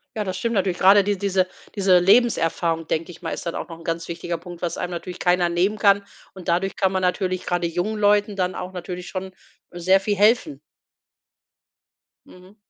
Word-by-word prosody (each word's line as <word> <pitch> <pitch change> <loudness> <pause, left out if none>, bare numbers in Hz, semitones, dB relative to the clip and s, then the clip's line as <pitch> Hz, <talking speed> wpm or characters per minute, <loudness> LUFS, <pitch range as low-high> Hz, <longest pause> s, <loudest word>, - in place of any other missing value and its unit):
Ja, 215 - -1
das 185 -1 -3
stimmt 230 +4 -2
natürlich. 185 -3 0
Gerade 195 +2 +6
die 205 -1 0
diese 190 -1 +1 0.3
diese 190 -3 +4
Lebenserfahrung, 170 -5 +2
denke 165 +3 -2
ich 175 - -15
mal, 165 - -4
ist - - -5
dann 170 - -3
auch - - -5
noch 165 - -8
'n - - -13
ganz 165 0 -3
wichtiger 170 0 -4
Punkt, 175 0 -11
was 175 - -3
einem 180 - -3
natürlich 180 +1 -6
keiner 180 -1 +2
nehmen 185 +5 +1
kann. 200 -1 +4 0.3
Und 185 -3 -12
dadurch 180 +3 0
kann 190 -1 +1
man 190 -1 -1
natürlich 185 0 -1
gerade 175 -1 -1
jungen 180 +6 -2
Leuten 205 0 +2
dann 185 -1 -1
auch 180 +1 -6
natürlich 180 0 -6
schon, 190 0 -5 0.4
äh, 175 - -9
sehr 185 +3 +4
viel 205 +1 0
helfen. 205 - +2 1.7
Mhm. 185 +3 -17
185 Hz, 205 wpm, -23 LUFS, 175-200 Hz, 1.7 s, Gerade